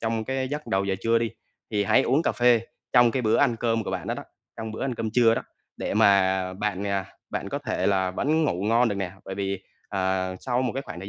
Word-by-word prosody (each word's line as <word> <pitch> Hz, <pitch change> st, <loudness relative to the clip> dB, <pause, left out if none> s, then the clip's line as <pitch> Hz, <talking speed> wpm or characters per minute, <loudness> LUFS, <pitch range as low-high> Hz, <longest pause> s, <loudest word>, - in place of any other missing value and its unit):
trong 115 Hz, -1 st, -1 dB
cái 130 Hz, +1 st, -2 dB
giấc 150 Hz, +1 st, -4 dB
đầu 95 Hz, 0 st, +1 dB
giờ 95 Hz, -1 st, 0 dB
trưa 115 Hz, 0 st, +3 dB
đi 115 Hz, -2 st, -1 dB, 0.4 s
thì 105 Hz, -1 st, +1 dB
hãy -, -, +4 dB
uống 140 Hz, +6 st, +2 dB
cà -, -, +1 dB
phê 120 Hz, -2 st, +4 dB, 0.3 s
trong 120 Hz, -1 st, +6 dB
cái 130 Hz, 0 st, -1 dB
bữa 110 Hz, +1 st, +3 dB
ăn 125 Hz, -5 st, +3 dB
cơm 115 Hz, -2 st, 0 dB
của -, -, -3 dB
bạn -, -, -4 dB
đó -, -, -1 dB
đó, -, -, -6 dB, 0.3 s
trong 110 Hz, -1 st, -5 dB
bữa -, -, -5 dB
ăn 130 Hz, -3 st, -1 dB
cơm 110 Hz, -1 st, -3 dB
trưa 115 Hz, -1 st, +4 dB
đó, -, -, -2 dB, 0.3 s
để -, -, -3 dB
mà 95 Hz, -3 st, +4 dB
bạn, 100 Hz, 0 st, -2 dB
à, 100 Hz, -1 st, -1 dB, 0.2 s
bạn -, -, -3 dB
có -, -, -2 dB
thể -, -, -2 dB
là 95 Hz, -2 st, +2 dB
vẫn 155 Hz, +10 st, +1 dB
ngủ 95 Hz, -9 st, -1 dB
ngon 115 Hz, +3 st, +3 dB
được 105 Hz, -, -1 dB
nè. 95 Hz, -2 st, -3 dB
Bởi 95 Hz, -, -5 dB
vì, 100 Hz, -1 st, -3 dB, 0.3 s
à, 95 Hz, -1 st, 0 dB
sau 125 Hz, 0 st, 0 dB
một 125 Hz, -, -1 dB
cái 135 Hz, +2 st, -3 dB
khoảng 85 Hz, -, -8 dB
thời 95 Hz, -, -7 dB
110 Hz, 260 wpm, -25 LUFS, 95-120 Hz, 0.4 s, trong